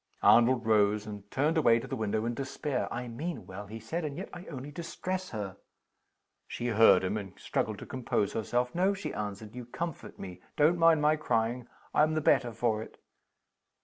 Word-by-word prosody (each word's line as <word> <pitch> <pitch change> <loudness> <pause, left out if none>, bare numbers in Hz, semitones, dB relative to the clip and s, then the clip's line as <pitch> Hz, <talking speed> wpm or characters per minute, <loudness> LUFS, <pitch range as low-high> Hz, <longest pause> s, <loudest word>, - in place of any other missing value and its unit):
Arnold 120 0 +5
rose, 105 -1 +3
and 105 -1 -8
turned 155 - +1
away 115 -6 +5
to 115 - -4
the - - -4
window 110 0 -1
in 120 - -1
despair. 135 +1 -3
"I 125 +1 -4
mean 155 +9 -5
well," 100 +2 -8
he 110 +3 -7
said. 160 +11 -4
"And 145 -2 -4
yet - - -5
I 180 - -8
only 140 -1 -7
distress 185 +3 -4
her!" 100 -3 -5 0.9
She 120 - -3
heard 110 -5 +6
him, 95 +3 0
and 100 -3 -6
straggled - - -1
to - - -8
compose 120 -5 -1
herself 120 +3 0
"No," 190 +3 +2
she 195 - -5
answered, 105 +1 -5
"you 125 0 -7
comfort 165 +5 -5
me. 90 -2 -8 0.2
Don't 160 +3 +4
mind 165 -2 +5
my 155 +1 +4
crying 120 -3 0 0.3
I'm 155 +1 +3
the - - +2
better 125 -4 +3
for 115 -1 0
it." - - -10
120 Hz, 190 wpm, -30 LUFS, 110-150 Hz, 0.9 s, heard